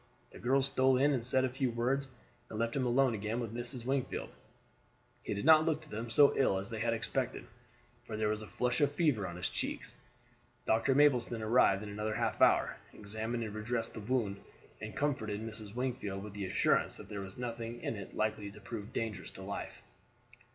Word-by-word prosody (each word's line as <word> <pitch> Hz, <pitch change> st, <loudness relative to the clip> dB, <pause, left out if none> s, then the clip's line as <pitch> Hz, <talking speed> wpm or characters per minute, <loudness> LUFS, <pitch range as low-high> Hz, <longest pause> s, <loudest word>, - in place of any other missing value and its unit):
The -, -, -11 dB
girls 135 Hz, +2 st, +3 dB
stole 130 Hz, -1 st, +3 dB
in 145 Hz, +3 st, +4 dB
and 125 Hz, -4 st, 0 dB
said 130 Hz, +2 st, +2 dB
a -, -, 0 dB
few 130 Hz, 0 st, 0 dB
words, 125 Hz, +4 st, 0 dB, 0.4 s
and 110 Hz, -, -6 dB
left 115 Hz, +1 st, 0 dB
him 130 Hz, -2 st, +1 dB
alone 130 Hz, +1 st, +4 dB
again 110 Hz, +2 st, -2 dB
with 115 Hz, -3 st, -4 dB
Mrs. 120 Hz, 0 st, -4 dB
Wingfield. 135 Hz, 0 st, -1 dB, 0.9 s
He 105 Hz, -, -3 dB
did 100 Hz, -, -3 dB
not 155 Hz, 0 st, +8 dB
look 155 Hz, -1 st, 0 dB
to 155 Hz, -, -16 dB
them 115 Hz, +2 st, -4 dB
so 140 Hz, +4 st, +6 dB
ill 115 Hz, -8 st, +3 dB
as 100 Hz, +4 st, -5 dB
they 110 Hz, -, -3 dB
had 115 Hz, +1 st, +1 dB
expected, 120 Hz, +2 st, -2 dB, 0.6 s
for 110 Hz, -, -4 dB
there 110 Hz, -1 st, +1 dB
was 105 Hz, 0 st, -1 dB
a 110 Hz, -, -8 dB
flush 120 Hz, +8 st, 0 dB
of 145 Hz, -1 st, +4 dB
fever 145 Hz, -, +1 dB
on 85 Hz, -, -6 dB
his 90 Hz, -, -1 dB
cheeks. -, -, -3 dB, 0.7 s
Dr. 115 Hz, +4 st, +3 dB
Mapleston 125 Hz, -5 st, +3 dB
arrived 110 Hz, -3 st, +4 dB
in 105 Hz, -, -6 dB
another 105 Hz, +1 st, -2 dB
half -, -, -1 dB
hour, -, -, +5 dB, 0.2 s
examined 110 Hz, +3 st, -3 dB
and 110 Hz, -2 st, -5 dB
redressed 115 Hz, +1 st, -2 dB
the -, -, -6 dB
wound, 105 Hz, -3 st, -1 dB, 0.4 s
and 110 Hz, 0 st, -6 dB
comforted 110 Hz, -8 st, 0 dB
Mrs. 110 Hz, -1 st, -7 dB
Wingfield 120 Hz, -6 st, -2 dB
with 105 Hz, -1 st, -8 dB
the 100 Hz, -2 st, -3 dB
assurance -, -, +2 dB
that -, -, -10 dB
there 100 Hz, -1 st, -5 dB
was 95 Hz, -1 st, -8 dB
nothing 120 Hz, -1 st, -4 dB
in -, -, -2 dB
it 100 Hz, -2 st, -8 dB
likely 105 Hz, -1 st, -1 dB
to 100 Hz, -, -12 dB
prove 105 Hz, -3 st, -7 dB
dangerous 110 Hz, -3 st, -3 dB
to 95 Hz, -, -10 dB
life. 100 Hz, +1 st, -6 dB
115 Hz, 205 wpm, -33 LUFS, 105-130 Hz, 0.9 s, not